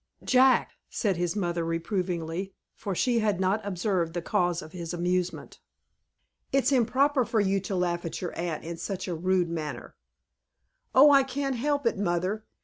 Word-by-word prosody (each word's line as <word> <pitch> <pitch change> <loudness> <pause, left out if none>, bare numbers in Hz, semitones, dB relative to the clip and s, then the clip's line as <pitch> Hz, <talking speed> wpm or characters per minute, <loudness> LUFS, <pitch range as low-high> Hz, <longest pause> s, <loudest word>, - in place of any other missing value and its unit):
"Jack!" 255 0 +4 0.2
said 200 -4 0
his 175 +1 -1
mother, 175 -4 -1
reprovingly, 175 +1 -3 0.2
for 195 -2 -5
she 240 +4 +2
had 210 -4 0
not 190 +3 +1
observed 180 -3 -1
the 175 - -1
cause 175 -1 0
of 155 - -11
his 170 -1 -5
amusement. 180 +1 -2 0.9
"It's 275 0 +2
improper 270 +2 +3
for 230 -1 0
you 195 -1 +2
to 195 +1 -4
laugh 175 -1 0
at 165 - -5
your 180 - -5
aunt 170 -2 -3
in 170 +1 -6
such 195 +2 -4
a 180 - -2
rude 180 +1 +1
manner." 155 -4 -5 1.0
"Oh, 285 +3 +8
I 275 -1 +7
can't 270 0 -2
help 285 +2 -1
it, 230 - +1
mother. 185 +3 -1
185 Hz, 165 wpm, -27 LUFS, 175-230 Hz, 1.0 s, Oh